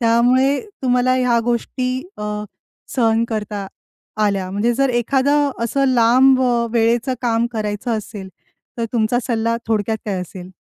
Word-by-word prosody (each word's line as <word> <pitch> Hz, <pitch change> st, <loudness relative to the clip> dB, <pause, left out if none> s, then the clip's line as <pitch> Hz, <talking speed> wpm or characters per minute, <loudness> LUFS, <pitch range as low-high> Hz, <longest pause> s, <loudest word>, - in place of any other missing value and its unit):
त्यामुळे 250 Hz, +4 st, +3 dB, 0.2 s
तुम्हाला 250 Hz, 0 st, +2 dB
ह्या 250 Hz, -2 st, +2 dB
गोष्टी 245 Hz, +2 st, -1 dB, 0.3 s
अ, -, -, -5 dB, 0.7 s
सहन 230 Hz, -2 st, +2 dB
करता 210 Hz, -2 st, -4 dB, 0.6 s
आल्या. 195 Hz, -3 st, -1 dB
म्हणजे 205 Hz, +5 st, +1 dB
जर 275 Hz, +2 st, +2 dB
एखादं 275 Hz, +4 st, +2 dB
असं 275 Hz, +4 st, 0 dB
लांब 255 Hz, +3 st, +5 dB
अ, 240 Hz, -2 st, +1 dB
वेळेचं 235 Hz, +2 st, +1 dB
काम 235 Hz, -1 st, +1 dB
करायचं 215 Hz, +1 st, -2 dB
असेल, 205 Hz, -2 st, -8 dB, 0.5 s
तर 230 Hz, -, 0 dB
तुमचा 235 Hz, 0 st, +1 dB
सल्ला 230 Hz, -1 st, 0 dB
थोडक्यात 220 Hz, 0 st, 0 dB
काय 195 Hz, -3 st, -2 dB
असेल? 180 Hz, 0 st, -9 dB
235 Hz, 135 wpm, -19 LUFS, 220-250 Hz, 0.7 s, लांब